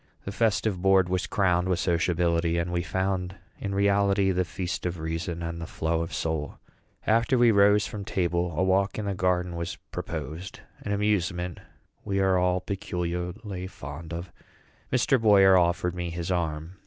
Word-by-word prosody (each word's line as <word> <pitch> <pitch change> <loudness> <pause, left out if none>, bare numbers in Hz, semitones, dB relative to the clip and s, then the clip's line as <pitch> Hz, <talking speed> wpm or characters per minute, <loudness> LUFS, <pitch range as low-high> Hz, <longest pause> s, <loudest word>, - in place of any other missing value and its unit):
The 100 - -4
festive 105 -3 +1
board 95 -1 +4
was 90 -2 -1
crowned 90 -2 +1
with 90 - +2
sociability, 85 -1 +1
and 85 +1 -1
we 85 - +1
found 95 +2 -2 0.2
in 100 -1 -3
reality 100 -1 +3
"the 90 0 +1
feast 90 +2 -4
of 90 0 -4
reason 80 +2 -3
and 85 0 -4
the 80 - -5
flow 80 +1 -1
of 85 +2 -4
soul." 80 -3 -3 0.5
After 115 +4 +3
we 120 -1 +6
rose 100 0 +5
from 105 -2 -6
table, 90 -2 0
a 90 - +2
walk 95 +2 +2
in 105 - -3
the 100 - -1
garden 90 -1 0
was 85 0 -4 0.2
proposed 80 +3 -6 0.2
an 100 - -5
amusement 90 -4 0 0.4
we 100 0 -1
are 95 -1 +3
all 90 0 +1
peculiarly 90 +1 -4
fond 80 -1 -9
of. 85 +1 -6 0.6
Mr. 130 0 +3
Boyer 100 -3 +6
offered 90 0 +2
me 90 -1 -3
his 85 +2 -4
arm. 85 +1 -2
90 Hz, 165 wpm, -27 LUFS, 85-100 Hz, 0.6 s, we